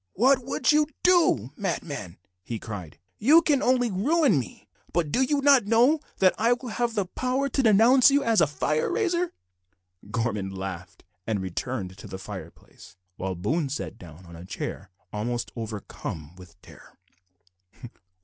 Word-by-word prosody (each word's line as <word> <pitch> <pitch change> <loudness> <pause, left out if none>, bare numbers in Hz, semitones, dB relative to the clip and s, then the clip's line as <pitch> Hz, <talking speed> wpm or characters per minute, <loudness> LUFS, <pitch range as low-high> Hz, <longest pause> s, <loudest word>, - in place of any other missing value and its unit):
"What 260 +5 +3
would 255 0 +1
you 300 0 +3 0.2
do, 325 - +3
madman?" 140 - -4 0.3
he 115 - -5
cried. 100 -8 -8 0.2
"You 310 +9 +6
can 285 -4 +2
only 245 -2 +2
ruin 260 - +2
me, 115 -8 -9 0.2
but 165 -4 0
do 255 - +1
you 280 +2 +1
not 275 -6 +5
know 245 +8 +4 0.2
that 185 -1 +4
I 230 +3 +4
will 245 0 -6
have 235 +1 -2
the 200 - 0
power 255 +8 -1
to 270 - 0
denounce 235 +4 +6
you 280 0 +2
as 225 -6 +3
a 160 - +4
fire 150 +1 -1
raiser?" 360 -5 0 0.8
Gorman 110 -5 -2
laughed, 95 -2 -7 0.2
and 110 -3 0
returned 95 +1 -4
to - - -10
the 95 - -7
fireplace, 95 - -11 0.2
while 95 0 -3
Boone 140 - -1
sat 130 -4 -5
down 85 +1 -13
on 85 0 -12
a 85 - -10
chair 90 - -6 0.2
almost 120 +3 -3
overcome 100 - -7
with 90 -1 -16
terror. - - -17
175 Hz, 160 wpm, -26 LUFS, -, 0.8 s, You